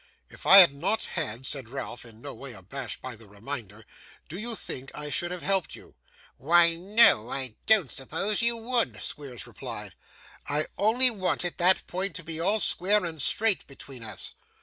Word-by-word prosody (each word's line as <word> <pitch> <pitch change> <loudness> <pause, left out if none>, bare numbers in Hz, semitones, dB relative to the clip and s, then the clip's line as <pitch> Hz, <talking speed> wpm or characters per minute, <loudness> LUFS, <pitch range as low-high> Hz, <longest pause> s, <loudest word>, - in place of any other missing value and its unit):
'If - - -10
I 195 - +10
had 175 -7 +9
not 200 +10 -2
had,' 130 -7 -4
said 130 -4 -4
Ralph, 125 -2 -7
in 115 0 -14
no 145 - -7
way 135 -3 -10
abashed 115 +6 -7
by 130 -2 -6
the 110 -1 -15
reminder, 110 0 -9 0.4
'do 175 - -7
you 230 +1 -4
think 135 -9 -6
I 150 0 -6
should 175 +5 -2
have 180 -1 -7
helped 195 -3 -1
you?' - - -16 0.4
'Why 170 +4 +4
no, 180 - +5
I 130 -4 -3
don't 210 - +3
suppose 180 - -3
you 235 0 0
would,' 235 +1 0
Squeers 130 -7 -7
replied. - - -9 0.6
'I 150 +2 +1
only 240 +5 +5
wanted 185 -4 -3
that 180 +2 +4
point 190 +2 -4
to 185 - -7
be 165 0 -5
all 200 +6 +1
square 200 +1 +2
and 160 -3 -5
straight 220 +5 +1
between 135 -2 -13
us. 105 -3 -7
165 Hz, 180 wpm, -26 LUFS, 130-195 Hz, 0.6 s, I